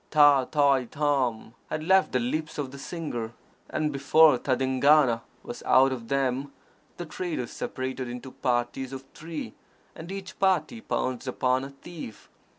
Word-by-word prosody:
Tâ 145 -4 +5
tai 140 -4 +3
tôm 130 -6 -1 0.2
had 155 - -3
left 190 +3 +4
the - - +2
lips 155 +6 -2
of 140 -3 -3
the 140 - -10
singer; 135 -9 -5 0.4
and, 150 -1 -1
before 140 0 +5
tadingana 130 -1 +3 0.2
was - - -7
out 135 +1 +5
of 120 -3 -5
them, 135 +1 0 0.5
the 175 - -5
traders 155 -6 -4
separated 130 -1 -4
into 125 +2 -7
parties 125 +1 -1
of 135 0 -7
three, 160 +1 -7 0.4
and 170 +3 -9
each 195 -1 -7
party 190 +3 +1
pounced 130 - -2
upon 130 +1 +1
a 135 - -6
thief. 140 - -10
135 Hz, 150 wpm, -27 LUFS, 130-155 Hz, 0.5 s, Tâ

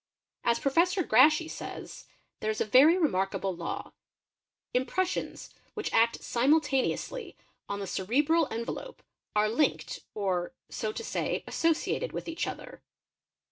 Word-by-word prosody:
As 235 0 +3
Professor 345 +8 +2
Grashey 300 +7 +5
says: - - -8 0.3
"there 215 - -2
1s 215 - -4
a - - +1
very 275 - +6
remarkable 195 - 0
law: 170 0 -5 0.8
impressions 355 +9 -2 0.2
which 425 - -3
act 230 +1 +3
simultaneously 295 - +1 0.3
on 200 - -3
the 200 - -3
cerebral 285 - +2
envelope 235 - -5 0.3
are 210 0 +4
linked 235 +8 0 0.2
or, 190 0 -1 0.2
so 215 - -3
to - - -6
say, - - -2
associated 330 +9 0
with - - -5
each 330 0 -2
other." - - -8
260 Hz, 125 wpm, -29 LUFS, 215-330 Hz, 0.8 s, very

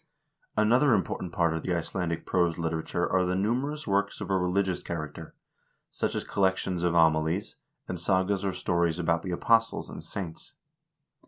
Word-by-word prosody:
Another 120 +5 +4
important 95 -2 -2
part 85 -3 +1
of 80 - -2
the 90 - -1
Icelandic 85 0 -2
prose 85 -3 +1
literature 80 +1 -1
are 95 - +2
the 90 0 0
numerous 130 +10 -1
works 100 -1 0
of - - -4
a - - +3
religious 95 0 +1
character, 80 -1 -6 0.6
such - - -2
as - - -1
collections 95 -2 0
of 85 -1 +1
homilies, 80 +3 +2 0.3
and 90 - -4
sagas 95 +2 +1
or 100 - 0
stories 85 -2 0
about 85 -1 +1
the 95 - -6
apostles 115 +5 +1
and - - -8
saints. 90 -5 -7
90 Hz, 160 wpm, -28 LUFS, 85-100 Hz, 0.6 s, Another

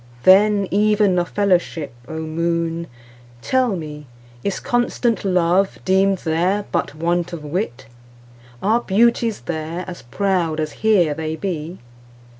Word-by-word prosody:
Then, 200 +1 +5
even 205 -2 +3
of 175 - -2
fellowship, 175 -8 0
O 160 - -6
Moon, 170 +1 -2 0.6
tell 255 -5 +1
me, 150 -3 -7 0.4
Is 200 - -2
constant 240 -1 0
love 185 0 +2
deem'd 190 +1 +3
there 180 +5 0
but - - -1
want 175 +2 -1
of 160 -3 -6
wit? 150 - -3 0.8
Are 225 +4 +3
beauties 230 +1 +2
there 165 +2 -4
as 175 -6 -8
proud 165 +5 -1
as 155 -1 -2
here 195 -8 +3
they 160 +1 -3
be? 170 -1 -4
180 Hz, 125 wpm, -20 LUFS, 160-200 Hz, 0.8 s, Then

